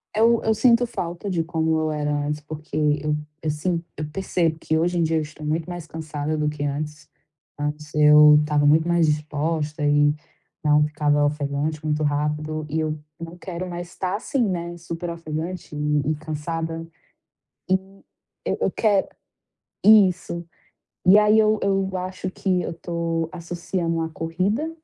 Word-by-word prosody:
Eu 230 +1 +4
eu 220 - +3
sinto 235 +2 +4
falta 175 -4 -4
de 170 -3 0
como 160 -1 0
eu 155 0 0
era 150 -1 -1
antes, 145 +1 -2
porque 150 0 -1
eu 150 0 +1 0.3
eu 155 - -1
sinto, 165 +3 -1
eu 155 - -3
percebo 170 -2 0
que 160 - 0
hoje 175 +2 +1
em - - +3
dia 160 0 +1
eu - - +1
estou 155 0 -8
muito 160 +3 -1
mais 175 -2 -6
cansada 155 -1 -4
do 150 0 +1
que 150 -1 -5
antes. 150 +1 -4 0.5
Antes 150 0 -4
eu 150 0 +8
estava 150 -1 +1
muito 155 +3 +4
mais 170 -1 +3
disposta 150 0 -1
e 145 0 +4 0.5
não 150 0 +4
ficava 150 -1 +1
ofegante 145 +1 -2
muito 155 0 0
rápido 150 +1 -1
e 160 +2 -1
eu 155 -1 -2 0.2
não 165 +1 -8
quero 180 0 -5
mais 175 0 -5
estar 185 +1 -3
assim, 245 +5 -1
né, 175 -2 -3
super 170 +1 -5
ofegante 165 0 -5
e 150 0 0
e - - 0
cansada. 165 +2 -4 0.9
E, - - +6 0.7
eu - - -1
eu - - +2
quero 205 -3 +2 0.8
isso. 185 -5 +4 0.6
E 190 +3 +8
aí 210 +1 +5
eu 215 0 +4
eu 195 -1 +1
acho 185 0 -4
que 185 -1 0
eu - - -4
estou 165 -1 -2
associando 170 -1 -3
à 160 - -2
corrida, 185 - -1
160 Hz, 165 wpm, -23 LUFS, 150-175 Hz, 0.9 s, eu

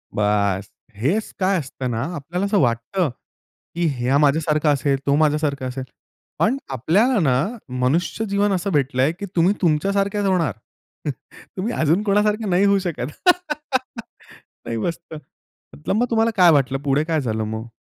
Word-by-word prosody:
बस! 100 -2 +1 0.3
हेच 190 - 0
काय 190 0 +2
असतं 130 -2 -5
ना 115 0 -2
आपल्याला 175 +6 -3
असं 200 0 +2
वाटतं, 130 +7 0 0.7
की 170 0 0
ह्या 125 +3 +1
माझ्यासारखा 150 +1 +2
असेल, 140 -1 +1
तो 140 - +3
माझ्यासारखा 150 -3 +1
असेल. 130 +1 -4 0.5
पण 250 +5 +2
आपल्याला 200 - +2
ना 135 -6 +3 0.5
मनुष्य 165 +11 0
जीवन 200 +1 +1
असं 190 +1 -1
भेटलंय, 140 0 +2
की 200 +4 -7
तुम्ही 180 +5 +4
तुमच्या 165 +4 +2
सारखेच 200 +1 0
होणार. 175 - +1 1.0
तुम्ही 215 +6 -2
अजून 160 +6 +2
कोणासारखं 210 +1 +1
नाही 180 +2 +3
होऊ 200 0 +4
शकत. 155 -7 -4 1.5
नाही, 115 - -3
मस्त. 165 +7 -4 0.6
मतलब 75 - -2
मग 245 +2 +2
तुम्हाला 225 0 +2
काय 180 -2 +7
वाटलं 135 -2 +2
पुढे 145 +2 +1
काय 160 -2 0
झालं 110 -4 -2
मग? 110 +1 -5
155 Hz, 150 wpm, -21 LUFS, 130-195 Hz, 1.5 s, काय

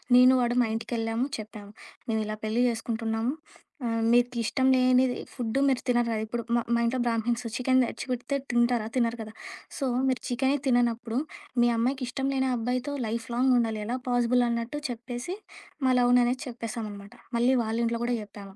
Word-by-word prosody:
నేను 255 +1 +8
వాడు 240 0 +1
మా 235 - +2
ఇంటికెళ్ళాము 225 +1 -1
చెప్పాము. 210 -1 -9 0.4
"మేమిలా 215 -1 -1
పెళ్లి 225 +3 +1
జేసుకుంటున్నాము. 225 +1 -1 0.5
ఆహ్, 230 -1 0
మీకిష్టం 245 +1 +2
లేనిది 255 0 +4 0.2
ఫుడ్డు 245 +1 -1
మీరు 265 -2 +2
తినరు 240 -1 +3
కదా!" 220 - -1
ఇప్పుడు 235 +1 -3
మా - - +2
మా - - +2
ఇంట్లో 250 +2 0
బ్రాహ్మిణ్స్ 235 +1 0
చికెను 255 0 +3
తెచ్చిపెడితే 255 +2 -3
తింటారా? 240 -2 +2
తినరు 235 -1 +1
కదా! 215 0 -10 0.5
"సో 275 - 0 0.2
మీరు 260 -1 0
చికెనే 265 +3 +1
తిననప్పుడు, 240 -1 +1 0.4
మీ 240 - +5
అమ్మాయికి 255 +3 0
ఇష్టం 270 +1 -2
లేని 265 0 +1
అబ్బాయితో 250 +4 -2
లైఫ్ 230 +1 -3
లాంగుండాలి. 240 -4 +2
ఎలా 250 +2 -1
పాజిబుల్" 245 0 +3
అన్నట్టు 235 +5 -2
చెప్పేసి, 245 +8 -5 0.5
మా 260 - +4
లవ్‌ని 245 0 +5
అనేది 250 +2 -1
చెప్పేసామనమాట. 220 -4 -6 0.2
మళ్ళీ 245 +3 +3
వాళ్ళ 220 0 -2
ఇంట్లో 230 0 -1
గూడా 245 - +1
చెప్పాము. 200 -1 -12
240 Hz, 160 wpm, -27 LUFS, 225-250 Hz, 0.5 s, నేను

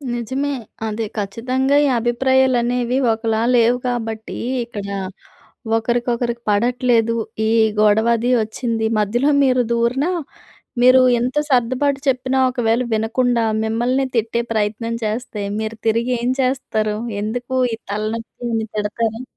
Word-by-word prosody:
నిజమే. 260 +5 -2 0.4
అది 220 +1 -3
ఖచ్చితంగా 255 +7 0
ఈ - - +3
అభిప్రాయాలు 260 +2 +2
అనేవి 245 +1 0 0.2
ఒకలా 225 0 -1
లేవు 235 +1 +4
కాబట్టి, 225 -2 -4 0.3
ఇక్కడ 205 -4 -7 0.9
ఒకరికొకరికి 235 +1 -1
పడట్లేదు. 235 +1 +2 0.3
ఈ - - +2 0.3
గొడవ 215 +2 +4
అది 240 +3 -1
ఒచ్చింది. 225 0 -2
మధ్యలో 240 +8 +1
మీరు 255 -2 +3
దూరినా 250 +8 +1 0.7
మీరు 255 +1 +7 0.2
ఎంత 250 +4 -2
సర్దుబాటు 260 +3 +1
చెప్పినా 260 0 +1
ఒకవేళ 240 -1 +1
వినకుండా, 235 +2 +1 0.2
మిమ్మల్ని 240 +4 0
తిట్టే 230 +1 0
ప్రయత్నం 220 +1 -1
చేస్తే, 215 -1 -3 0.2
మీరు 220 0 -4
తిరిగి 235 +3 +1
ఏం 245 - 0
చేస్తారు? 220 -5 -1 0.2
ఎందుకు 245 +4 -3 0.2
ఈ - - 0 0.2
తలనొప్పి 220 +3 -4
అని 225 -1 0
తిడతార? 220 +3 -2
235 Hz, 120 wpm, -19 LUFS, 220-255 Hz, 0.9 s, మీరు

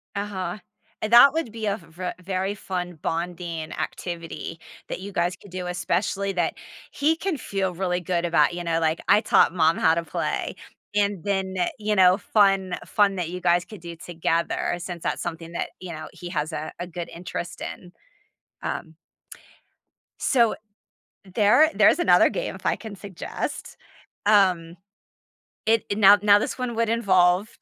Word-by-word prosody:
Uh-huh, 200 -2 -3 0.4
and 215 +2 -2
that 270 +4 +9
would 320 -9 -2
be 225 -1 -5
a 205 0 0
v 165 - -17
ve 180 +2 -4
very 190 +2 -2
fun 180 -3 -4
bonding 170 -1 -3
activity 165 0 -5 0.3
that - - -4
you 200 +1 -7
guys 175 -1 0
could 200 - -17
do, 180 -1 -4
especially 195 +2 -1
that 175 -2 0 0.4
he 310 +3 +2
can 340 -2 -2
feel 195 -5 -2
really 180 0 -1
good 175 0 -1
about, 165 -1 +3
you 175 0 -4
know, 165 -1 0
like, 160 0 +1
"I 210 - +5
taught - - +4
mom 165 -1 +3
how 160 - +4
to 170 - -1
play." - - -3 0.4
And 200 -4 +1
then, 190 -2 -1 0.2
you 210 0 -1
know, 185 0 +6
fun 195 -3 +2
fun 200 -2 +2
that 175 -2 -3
you 180 - -5
guys 175 -1 +3
could 210 -1 -12
do 170 -1 -8
together 165 0 -1
since 175 -1 -7
that's - - -2
something 165 -1 -5
that, 170 - -3
you 180 -2 -7
know, 155 0 -7
he 175 - -9
has 150 0 -2
a 155 - -4
a 175 - -4
good 175 0 -6
interest 175 0 -6
in. 180 -1 -7 0.7
Um 160 -1 -5 1.2
so, 235 -5 +3 0.8
there 235 +9 +5
there's - - +5
another - - +5
game, - - -3
if - - -12
I - - +2
can 220 -3 -9
suggest. 190 -2 -6 0.5
Um, 185 -5 +3 0.9
it 225 0 +3
i - - +1
now 205 0 +7
now, 205 -1 +7
this 215 - -3
one 250 -2 -3
would 230 -1 +1
involve 190 -3 +3
185 Hz, 170 wpm, -24 LUFS, 170-205 Hz, 1.2 s, that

